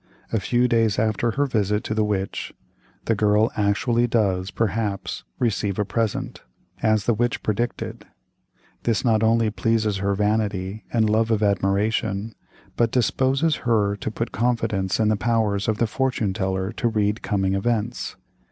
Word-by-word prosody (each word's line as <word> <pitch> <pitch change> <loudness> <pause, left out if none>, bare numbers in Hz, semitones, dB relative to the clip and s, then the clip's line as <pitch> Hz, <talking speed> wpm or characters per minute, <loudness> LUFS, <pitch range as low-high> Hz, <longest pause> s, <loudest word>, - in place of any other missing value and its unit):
A 110 - +2
few 120 +4 +2
days 115 -3 +2
after 110 +1 +1
her 140 +5 +1
visit 105 -4 0
to 110 - -2
the 110 0 +1
witch, 100 -2 -2 0.5
the 115 - +2
girl 105 +1 +3
actually 115 +4 +1
does, 95 -5 +1
perhaps, 105 - -2
receive 105 -4 0
a 105 - 0
present, 110 +2 -2 0.4
as 110 -2 +2
the 120 - +3
witch 120 +2 -1
predicted; 115 +3 -3 0.7
this 115 -1 0
not 110 -3 +3
only 115 0 +3
pleases 110 -2 0
her 100 +1 0
vanity 105 -1 -1
and 110 -2 +2
love 110 +1 +2
of 110 -2 +1
admiration, 100 +1 0 0.4
but 120 -1 +2
disposes 130 +6 +1
her 105 -4 +1
to - - -4
put 115 +2 -4
confidence 115 -6 0
in 110 -1 +3
the 110 - +3
powers 105 -2 0
of 110 -1 +1
the 115 - +2
fortune 115 -4 -1
teller 95 +1 -1
to 120 - -1
read 105 -1 0
coming 95 -3 0
events. 115 +3 -1
110 Hz, 155 wpm, -23 LUFS, 100-115 Hz, 0.7 s, girl